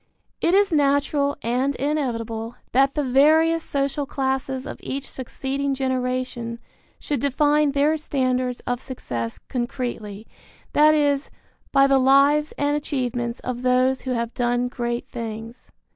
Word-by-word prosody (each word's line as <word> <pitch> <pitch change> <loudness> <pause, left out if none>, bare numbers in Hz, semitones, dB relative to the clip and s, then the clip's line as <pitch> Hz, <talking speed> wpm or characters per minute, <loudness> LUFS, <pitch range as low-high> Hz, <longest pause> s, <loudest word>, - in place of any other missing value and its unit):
It 345 - +3
is 400 -3 +3
natural 285 0 +2
and 255 +4 0
inevitable 235 -5 -2 0.2
that 270 +2 +3
the 295 - +1
various 315 +5 +4
social 280 0 -1
classes 265 -1 -2
of - - -7
each 275 0 -4
succeeding 270 +2 -3
generation 255 -2 -2 0.4
should 290 -3 -2
define 290 +2 +2
their 295 +3 +2
standards 255 -4 -1
of 245 0 -3
success 120 - -5
concretely, 240 -4 -4 0.5
that 305 +1 +6
is, 285 -1 +1 0.4
by 275 0 +5
the 275 -1 +4
lives 280 +3 +4
and 290 0 +1
achievements 245 -5 -2
of 250 -1 -4
those 255 +1 +2
who 260 - -4
have 235 -1 -2
done 245 0 0
great 240 -1 -3
things. 230 +1 -7
265 Hz, 130 wpm, -23 LUFS, 245-285 Hz, 0.5 s, that